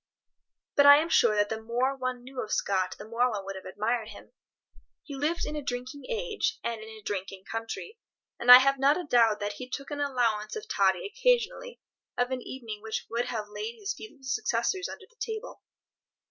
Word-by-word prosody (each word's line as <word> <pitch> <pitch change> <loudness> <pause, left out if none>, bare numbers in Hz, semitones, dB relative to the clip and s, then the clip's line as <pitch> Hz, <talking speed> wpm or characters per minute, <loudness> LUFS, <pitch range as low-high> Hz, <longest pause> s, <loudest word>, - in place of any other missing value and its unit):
But 285 0 +6
I 285 0 +11
am 320 +3 0
sure 235 -9 +4
that 205 0 +2
the 220 0 -3
more 245 +4 0
one 255 -2 -3
knew 260 0 -6
of 215 - -6
Scott 190 -2 0
the 210 - -10
more 240 +3 +2
one 205 -4 -4
would 195 0 -5
have 190 - -9
admired 220 +3 -1
him. - - -12 0.7
He 290 - -9
lived 300 +5 -1
in 305 - -4
a 300 - -3
drinking 255 +2 -5
age, 445 -2 -1
and 230 -2 -3
in 220 - -9
a 220 -1 -12
drinking 190 -1 -4
country, 225 - -6 0.4
and 245 - +6
I 250 - +15
have 275 +1 +3
not 280 +5 +4
a - - -4
doubt 230 -7 +3
that 205 0 -2
he 250 +4 -8
took 275 +2 -6
an 290 - -4
allowance 235 -6 0
of 440 - -6
toddy - - +2
occasionally - - 0 0.4
of 245 +1 +1
an 255 -1 -2
evening 230 -5 -7
which 220 0 -4
would 235 +1 0
have 220 -4 -4
laid 435 - -5
his 410 -1 -3
feeble 300 -12 -12
successors 260 +7 -1
under - - -9
the 470 - -31
table. 445 +1 -5
250 Hz, 205 wpm, -28 LUFS, 220-300 Hz, 0.7 s, I